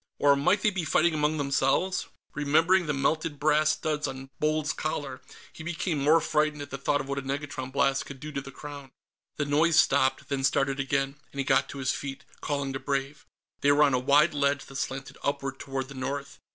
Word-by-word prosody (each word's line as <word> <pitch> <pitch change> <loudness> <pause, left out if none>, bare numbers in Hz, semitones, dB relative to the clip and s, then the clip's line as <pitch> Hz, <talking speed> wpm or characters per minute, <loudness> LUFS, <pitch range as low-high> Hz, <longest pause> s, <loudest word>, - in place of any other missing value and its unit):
Or 145 -1 +5
might 185 +9 +2
they 215 - +4
be 190 -3 -2
fighting 160 +1 +2
among 150 0 +1
themselves? 140 +6 +1 0.3
Remembering 160 +5 +3
the - - +1
melted 155 +2 0
brass 155 +1 +3
studs 155 -1 -2
on 135 0 -8
Bold's 155 0 +1
collar, 145 -4 -4 0.3
he - - -10
became 165 -1 -2
more 150 +4 +5
frightened 150 -2 0
at - - -12
the 135 - -5
thought 145 +1 +1
of 135 - -8
what 140 0 -2
a - - -4
negatron 135 -1 -4
blast 135 0 +1
could 140 -1 -9
do 150 +2 -7
to 140 -1 -3
the 135 - -10
Crown. 145 -1 -9 0.5
The 145 - -1
noise 155 +3 +3
stopped, 140 -2 +3
then 140 -1 -1
started 135 0 +1
again, 135 +1 -1
and - - -13
he - - +2
got 135 +1 +2
to - - -7
his 130 -1 0
feet, 135 -1 -6 0.2
calling 140 -2 -2
to 135 - -3
Brave. 140 +1 -3 0.3
They 145 - +4
were 150 +1 +5
on 140 -2 +3
a 125 - +3
wide 145 +5 +4
ledge 140 -1 +1
that 135 - -8
slanted 135 +1 -5
upward 135 -1 -2
toward 135 -1 -4
the 140 - -10
north. 140 +1 -5
140 Hz, 215 wpm, -28 LUFS, 135-150 Hz, 0.5 s, Or